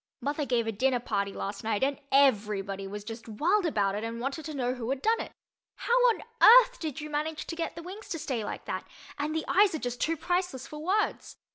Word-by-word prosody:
Mother 290 +1 -2
gave 235 -2 +1
a 225 - -1
dinner 250 +4 +1
party 200 -4 -2
last 200 +1 -5
night 220 +1 0
and 275 0 0
everybody 205 -7 +2
was 205 +1 -6
just 225 +2 -8
wild 350 - +2
about 200 -9 +1
it 210 +2 -3
and 230 +1 -4
wanted 275 +5 -3
to 310 -2 -5
know 250 -2 0
who 245 -2 -5
had 270 0 -1
done 450 +9 +2
it. - - -7 0.4
How 475 - -2 0.2
on 460 - -1 0.2
earth - - +8
did 310 -3 -4
you 300 - -5
manage 305 +1 -3
to 330 - -5
get 330 -1 -3
the 335 - -8
wings 390 +5 -9
to 335 - -2
stay 260 -7 -3
like - - -6
that? - - -4 0.3
And 305 +2 -1
the 320 - -1
eyes 395 -3 +4
are - - 0
just 245 -3 -4
too 330 +1 +1
priceless 350 -5 -1
for 300 - -9
words. 385 +7 -1
275 Hz, 235 wpm, -29 LUFS, 225-330 Hz, 0.4 s, earth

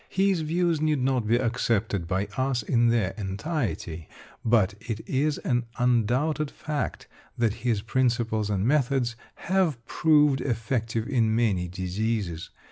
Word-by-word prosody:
His 190 -2 +2
views 165 0 0
need 155 -2 +2
not 130 -4 +1
be 115 - +4
accepted 115 -6 0
by 95 +2 0
us 130 -3 0
in 120 +2 +2
their 115 -5 +1
entirety, 95 - -3 0.3
but 110 -4 +3
it 115 -3 -5
is 145 +3 +1
an 120 -2 -1
undoubted 125 +6 +1
fact 150 -2 -4 0.3
that 115 -3 +2
his 115 -4 0
principles 115 -3 0
and 100 -1 0
methods 130 -3 +1 0.2
have 170 -10 0
proved 150 -2 +3
effective 115 -2 -1
in 115 -5 +2
many 100 -7 +1
diseases. 95 0 -3
120 Hz, 130 wpm, -26 LUFS, 105-140 Hz, 0.3 s, be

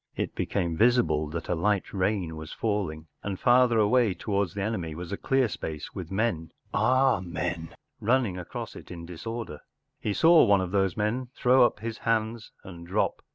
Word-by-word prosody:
It - - -3
became 85 -4 -1
visible 110 -8 +3
that 85 +2 -5
a - - 0
light 100 +3 0
rain 95 -4 -1
was 80 0 -8
falling, 95 -8 -2 0.2
and 100 -2 -4
farther 120 -1 +4
away 110 -1 +3
towards 100 -4 -1
the 100 - -2
enemy 90 -8 -3
was 85 +2 -7
a - - -1
dear 135 +4 +1
space 80 -7 -6
with 90 -4 -6
men—“ 95 -6 -1 0.2
our 130 -5 +3
men? 85 -1 -3
n - - -18 0.3
—running 115 -4 +2
across 90 -2 -6
it - - -11
in 85 -2 -8
disorder. 90 0 -6 0.4
He 105 - -1
saw 165 +7 +6
one 100 -1 +4
of 95 -1 -3
those 95 -2 +1
men 110 +5 -1
throw 125 0 +5
up 105 - -9
his 115 0 -5
hands 115 0 -1
and 85 -2 -10
drop. 95 +4 0
100 Hz, 185 wpm, -27 LUFS, 85-115 Hz, 0.4 s, saw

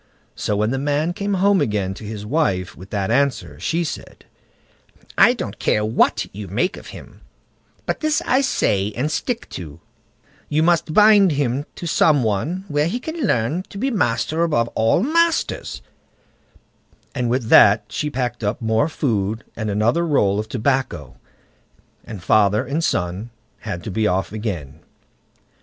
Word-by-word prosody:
So 105 - -1
when 105 +2 0
the 135 - -1
man 145 +4 0
came 200 +2 -2
home 195 -1 +3
again 105 -7 -1
to 95 - -11
his 105 -1 -6
wife 105 - 0
with 95 +3 -12
that 100 0 -2
answer, 140 +2 0
she 170 +1 -1
said: 160 - -7 0.9
"I - - +6
don't - - -6
care 105 - +1
what 110 - +2
you 100 0 -7
make 120 - -1
of - - -11
him; - - -12 0.6
but - - -2
this 310 -1 +1
I 260 +2 +3
say 100 - 0
and 145 +6 -1
stick 240 - -3
to, 80 -3 -8 0.7
you 155 +1 +2
must 170 -2 +2
bind 210 -4 +6
him 140 0 -1
to - - -7
some 155 -4 +3
one 145 - -2
where 150 -1 +1
he 235 +8 -2
can 315 -2 -3
learn 120 - 0
to - - -10
be 265 +6 -1
master 155 - 0
above 130 -9 +1
all 115 - +2
masters"; 335 +4 0 1.3
and 125 -3 -1
with 120 -2 -1
that 105 +1 +6
she 150 - -2
packed 125 -3 -3
up 105 +2 -1
more 110 +6 +1
food 110 -8 -1
and 110 -2 -3
another 110 +11 +1
roll 105 -11 +2
of 110 - -5
tobacco, 125 - -1 0.9
and 100 -5 -9
father 105 +4 +3
and 145 +6 -2
son 95 - -1 0.3
had 100 -6 -6
to 110 - -5
be 110 +2 +1
off 95 -3 -1
again. 100 - -5
120 Hz, 160 wpm, -21 LUFS, 105-165 Hz, 1.3 s, I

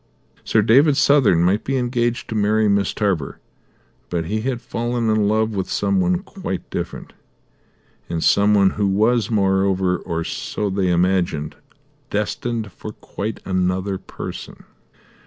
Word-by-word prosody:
Sir 110 - +2
David 135 +6 +5
Southern 135 - +4
might 95 +4 +2
be 135 0 -1
engaged 120 -1 -1
to - - -3
marry 110 0 +2
Miss 100 -1 +2
Tarver, 95 -9 -1 0.7
but 85 -2 -2
he 110 +6 -2
had 125 0 -2
fallen 120 -1 -2
in 110 -1 +2
love 110 +1 +1
with 95 -3 -3
some 195 -1 +1
one 180 0 0
quite 190 - -6
different, - - -5 1.0
and 85 -1 -2
some 105 +1 +4
one 100 -2 +4
who 105 -1 0
was, 110 +3 +2
moreover, 95 -3 +1
or 85 0 -3
so 105 +4 -3
they 95 -1 0
imagined, 90 -4 0 0.5
destined 105 +1 -2
for 105 +3 -9
quite 105 +2 -6
another 95 +1 -1
person. - - -8
105 Hz, 140 wpm, -21 LUFS, 95-120 Hz, 1.0 s, David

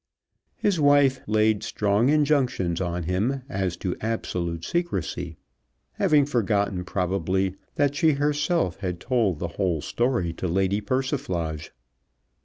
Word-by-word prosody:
His 195 -5 0
wife 145 -2 +4
laid 110 -1 +2
strong 105 +4 +1
injunctions 135 - +1
on 90 -1 -2
him 105 - -1
as 95 -8 -2
to 90 - -3
absolute 85 -7 -3
secrecy, 90 - -2 0.5
having 150 -2 +3
forgotten, 100 -8 0
probably, 95 0 0 0.2
that 145 -1 +2
she 155 +1 +3
herself 145 - 0
had 90 -3 -4
told 110 - +1
the 85 - -3
whole 90 -5 +1
story 120 - 0
to 90 - -4
Lady 95 +3 +1
Persiflage. 100 - -2
100 Hz, 120 wpm, -25 LUFS, 90-135 Hz, 0.5 s, wife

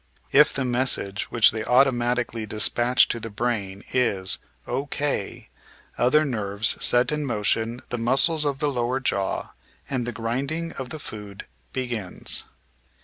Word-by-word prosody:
If - - +6
the 135 - -2
message 120 -5 0
which 115 -2 +5
they 110 0 -4
automatically 120 -3 +1
dispatch 120 +4 +3
to 120 - -2
the 115 - -6
brain 105 -3 -3
is 100 -7 +1 0.3
"O.K." 140 -3 -3 0.5
other 150 +6 +3
nerves 105 -5 0
set 120 +2 +4
in 150 0 -1
motion 115 -1 -1
the 120 - -3
muscles 135 +7 +4
of 145 -2 -1
the 150 0 0
lower 125 0 -1
jaw, 100 -7 -2 0.4
and 125 -3 -2
the - - -2
grinding 135 +9 -3
of 130 -2 -7
the 155 - -6
food 105 -8 -9 0.3
begins. 120 -8 -2
120 Hz, 140 wpm, -24 LUFS, 110-135 Hz, 0.5 s, If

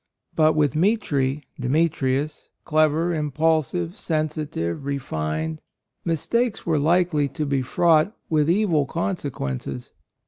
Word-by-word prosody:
But 155 -1 +4
with 150 -1 +2
Mitri 150 -7 +1 0.2
(Demetrius)— 145 +1 0 0.2
clever, 155 +2 +2
impulsive, 160 +3 0
sensitive, 155 - -2
re 140 0 -1
fined 80 - -3 0.2
— - - -52
mistakes 235 +8 -1
were 160 -3 +2
likely 160 -1 +2
to 140 +3 -4
be 140 -2 0
fraught 160 +6 +3 0.2
with 155 -1 +2
evil 170 -7 +2
conse 170 -1 -2
quences. 65 - -5
155 Hz, 115 wpm, -23 LUFS, 135-165 Hz, 0.2 s, But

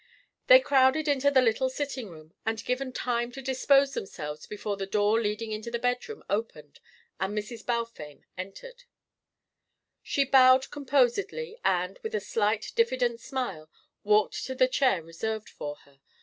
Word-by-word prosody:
They - - +10
crowded 280 - +3
into 285 -1 +3
the 265 -2 +4
little 250 +3 +2
sitting 265 -4 -4
room, 155 -1 -14
and 225 0 -2
were - - -7
given 255 +1 -2
time 240 -1 -2
to 270 - -8
dispose 275 +1 +3
themselves 150 - -6
before 210 0 -4
the 195 -1 -5
door 210 +3 +2
leading 215 +1 -2
into 215 +2 -4
the 235 - -2
bedroom 250 - -2
opened 195 -9 -4 0.4
and 195 +2 -2
Mrs. 210 +2 -5
Balfame 230 -11 -4
entered. 485 - -9 1.2
She 280 - 0
bowed 260 -1 +5
composedly 295 - 0
and, 180 - 0
with 220 - -4
a - - +1
slight 210 +1 -1
diffident 255 - +1
smile, 225 - -5 0.3
walked 210 0 +2
to 260 - -5
the 255 0 +4
chair 255 - +2
reserved 215 +7 -5
for 145 0 -6
her. 140 -1 -25
235 Hz, 155 wpm, -28 LUFS, 205-265 Hz, 1.2 s, They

